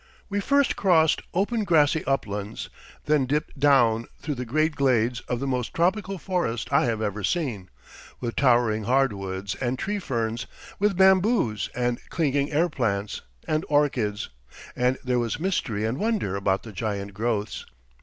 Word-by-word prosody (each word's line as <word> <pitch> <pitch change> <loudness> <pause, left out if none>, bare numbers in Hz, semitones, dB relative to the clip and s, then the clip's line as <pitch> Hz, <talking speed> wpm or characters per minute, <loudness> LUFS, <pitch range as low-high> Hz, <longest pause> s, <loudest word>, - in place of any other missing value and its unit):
We 205 0 -1
first 280 +6 +2
crossed 165 -5 +3
open 210 +5 0
grassy 160 -4 +3
uplands, 105 -6 -2 0.4
then 150 -3 +2
dipped 150 0 -2
down 120 -5 +4
through 150 - -3
the 125 -2 -5
great 155 +5 +1
glades 125 -3 +2
of 125 - -1
the 135 - -3
most 125 -3 -2
tropical 190 +3 +1
forest 165 - -2
I 140 - +4
have 115 -2 -1
ever 105 0 -3
seen, 110 - -2 0.5
with 120 -2 -4
towering 120 -5 +3
hard 135 -1 +3
woods 95 0 -4
and 130 0 -2
tree 205 +8 -2
ferns, 115 - -2 0.3
with 200 -2 +2
bamboos 190 - +3
and 120 0 0
clinging 145 -3 0
air 160 +4 +3
plants 105 - -2 0.3
and 155 0 0
orchids, 130 -9 +1 0.5
and 125 +1 +1
there 125 -1 +1
was 120 +2 -2
mystery 125 - -1
and 115 +6 -2
wonder 215 - 0
about 100 0 0
the 110 - -9
giant 100 0 -4
growths. 110 0 -2
130 Hz, 155 wpm, -25 LUFS, 110-160 Hz, 0.5 s, down